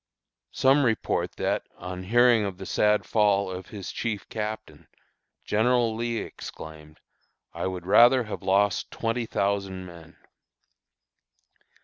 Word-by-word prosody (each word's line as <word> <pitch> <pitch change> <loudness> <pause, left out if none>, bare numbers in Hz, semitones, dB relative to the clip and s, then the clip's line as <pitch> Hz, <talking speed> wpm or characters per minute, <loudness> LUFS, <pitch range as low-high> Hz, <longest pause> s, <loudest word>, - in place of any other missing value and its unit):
Some 135 +2 +4
report 115 -4 0
that, - - -2
on 90 0 -7
hearing 120 +1 +4
of 100 -3 -4
the 95 - -8
sad 105 +2 +2
fall 100 -3 +2
of 90 0 -7
his 100 -3 -7
chief 110 -4 -4
Captain, 110 0 -6 0.6
General 115 +1 +2
Lee 115 0 -2
exclaimed, 80 -6 -9 0.5
"I - - -3
would 90 -2 -5
rather 120 +6 +6
have 110 - -7
lost 100 0 +1
twenty 115 0 -2
thousand 100 -2 -2
men!" 85 -2 -13
105 Hz, 120 wpm, -26 LUFS, 95-115 Hz, 0.6 s, rather